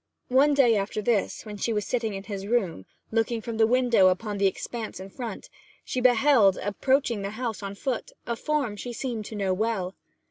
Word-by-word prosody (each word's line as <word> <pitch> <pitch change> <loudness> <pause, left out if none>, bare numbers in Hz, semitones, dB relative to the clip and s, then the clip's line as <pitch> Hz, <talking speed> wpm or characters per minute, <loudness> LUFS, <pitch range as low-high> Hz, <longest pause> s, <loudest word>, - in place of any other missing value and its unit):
One 280 +3 +4
day 245 -5 +5
after 200 +1 -1
this, 215 -1 0
when 210 -1 -7
she 230 - -1
was 210 -2 -1
sitting 225 -4 -1
in 195 - -6
his 200 -2 -6
room, 195 - 0 0.2
looking 225 +1 +1
from 225 0 -5
the 220 -1 +5
window 240 -5 +4
upon 200 +2 0
the 200 - +4
expanse 220 +3 -4
in 190 +1 -9
front, 235 -4 -6 0.4
she 255 - -2
beheld, 245 -5 +5
approaching 235 +2 +1
the 200 - -3
house 225 0 -4
on 200 0 -5
foot, 250 +3 -3
a 235 - -2
form 280 -4 -1
she 240 +4 -6
seemed 235 -3 -4
to 220 - -7
know 195 -2 0
well. 195 -2 -1
220 Hz, 200 wpm, -26 LUFS, 200-245 Hz, 0.4 s, day